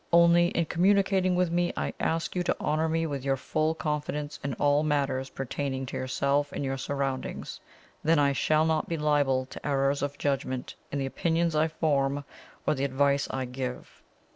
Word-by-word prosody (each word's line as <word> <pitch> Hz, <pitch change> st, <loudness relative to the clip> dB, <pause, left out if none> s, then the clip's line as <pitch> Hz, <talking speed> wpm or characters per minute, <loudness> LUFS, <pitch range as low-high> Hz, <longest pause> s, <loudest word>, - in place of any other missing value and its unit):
Only, 170 Hz, 0 st, +6 dB
in 170 Hz, -1 st, 0 dB
communicating 190 Hz, +1 st, +3 dB
with 180 Hz, -1 st, +1 dB
me, 175 Hz, 0 st, +1 dB
I -, -, -2 dB
ask 165 Hz, +2 st, -1 dB
you 180 Hz, -, +1 dB
to 175 Hz, -, -1 dB
honour 155 Hz, +2 st, 0 dB
me 165 Hz, +1 st, +1 dB
with 140 Hz, -4 st, -3 dB
your 135 Hz, -1 st, +1 dB
full 155 Hz, +4 st, 0 dB
confidence 150 Hz, -1 st, -3 dB
in 140 Hz, -3 st, -2 dB
all 145 Hz, 0 st, +3 dB
matters 140 Hz, -3 st, 0 dB
pertaining 135 Hz, 0 st, -3 dB
to -, -, -7 dB
yourself 140 Hz, +3 st, 0 dB
and 140 Hz, -, -3 dB
your 135 Hz, 0 st, -2 dB
surroundings 135 Hz, -1 st, -3 dB, 0.4 s
then 160 Hz, +1 st, +4 dB
I 140 Hz, -1 st, +3 dB
shall 155 Hz, +3 st, +2 dB
not 160 Hz, -1 st, 0 dB
be 165 Hz, -, -1 dB
liable 145 Hz, -4 st, +2 dB
to -, -, -11 dB
errors 140 Hz, -1 st, +1 dB
of 145 Hz, 0 st, -3 dB
judgment 130 Hz, -2 st, -2 dB, 0.2 s
in 145 Hz, -, -2 dB
the 135 Hz, -, -1 dB
opinions 165 Hz, +4 st, 0 dB
I 155 Hz, +1 st, +3 dB
form 145 Hz, -3 st, 0 dB, 0.4 s
or -, -, +3 dB
the 135 Hz, -2 st, -2 dB
advice 140 Hz, +1 st, +2 dB
I 130 Hz, -1 st, -2 dB
give." 125 Hz, 0 st, -6 dB
145 Hz, 185 wpm, -28 LUFS, 135-160 Hz, 0.4 s, Only